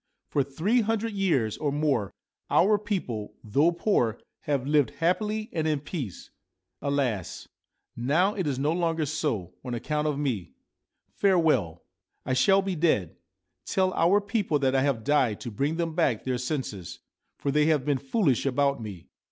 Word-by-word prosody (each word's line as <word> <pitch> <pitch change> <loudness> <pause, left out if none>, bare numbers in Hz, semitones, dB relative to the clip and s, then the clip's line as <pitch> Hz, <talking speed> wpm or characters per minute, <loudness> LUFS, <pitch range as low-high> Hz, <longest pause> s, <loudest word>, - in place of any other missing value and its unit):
' - - -56
For 145 - +2
three 165 - +1
hundred 225 0 -1
years 160 - +1
or 145 -2 0
more 140 -9 0 0.4
our 205 +4 +4
people, 175 - -4
though 140 +10 +3
poor, 170 - +1 0.3
have 140 -3 0
lived 145 -4 +3
happily 210 +6 0
and 160 -1 0
in 155 -2 +1
peace. 140 - -6 0.5
Alas! 135 - -2 0.5
now 155 - +2
it 190 -6 -2
is 135 -3 -1
no 145 +3 +1
longer 165 -2 0
so, 130 - -2
on 125 -2 -4
account 150 +5 -1
of 150 -2 -1
me. 120 - -2 0.6
Farewell! 155 - +2 0.4
I 130 - 0
shall 195 +10 +4
be 195 -1 -2
dead. 105 - +1 0.5
Tell 185 -1 +1
our 180 +5 +4
people 200 -6 0
that 135 -2 +1
I 135 - +3
have 135 -5 0
died 130 -6 +2
to 120 - -5
bring 140 +9 -1
them 165 -1 -1
back 125 -7 +1
their 130 -1 -1
senses, 125 - -4 0.4
for 140 - -1
they 150 +1 +3
have 150 -5 +2
been 145 -3 +1
foolish 140 - +1
about 140 0 +1
me. 100 -6 -8
145 Hz, 165 wpm, -27 LUFS, 125-170 Hz, 0.6 s, our